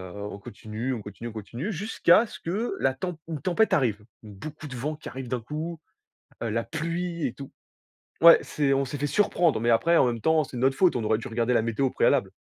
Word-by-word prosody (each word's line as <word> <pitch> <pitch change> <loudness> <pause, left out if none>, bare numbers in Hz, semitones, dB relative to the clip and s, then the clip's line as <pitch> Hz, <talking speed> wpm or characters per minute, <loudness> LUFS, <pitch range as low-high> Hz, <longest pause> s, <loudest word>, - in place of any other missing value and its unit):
on 100 0 -6
continue, 110 +5 -5
on 115 - -4
continue, 105 +3 -8
on - - -9
continue 120 - -5
jusqu'à 210 +2 +3
ce - - -11
que 205 +8 -2
la 135 - +2
tem 180 +6 -4
une 160 -3 -5
tempête 190 +4 +2
arrive. 110 -7 +1 0.2
Beaucoup 115 +9 -9
de 125 - -8
vent 150 +5 -3
qui 155 - -9
arrive 130 -1 -7
d'un 125 0 -2
coup, 155 +7 -5 0.6
heu, 115 - -1
la 115 +2 -1
pluie 170 +1 -3
et 120 - -1
tout. 135 0 -10 0.7
Ouais, 170 0 +10
c'est 145 -2 0
on 135 0 +2
s'est 130 - -5
fait 145 +1 -1
surprendre, 170 - +2
mais 115 - 0
après 120 +9 +4
en 130 - +5
même 115 -2 -2
temps, 160 -1 +3
c'est 130 - -8
de 120 - -3
notre 135 +1 +3
faute, 180 -3 +3
on 115 - -2
aurait 110 0 +2
dû 115 - -7
regarder 115 +1 0
la 120 - +4
météo 115 +3 -1
au - - -8
préalable. - - +2
135 Hz, 235 wpm, -26 LUFS, 115-165 Hz, 0.7 s, Ouais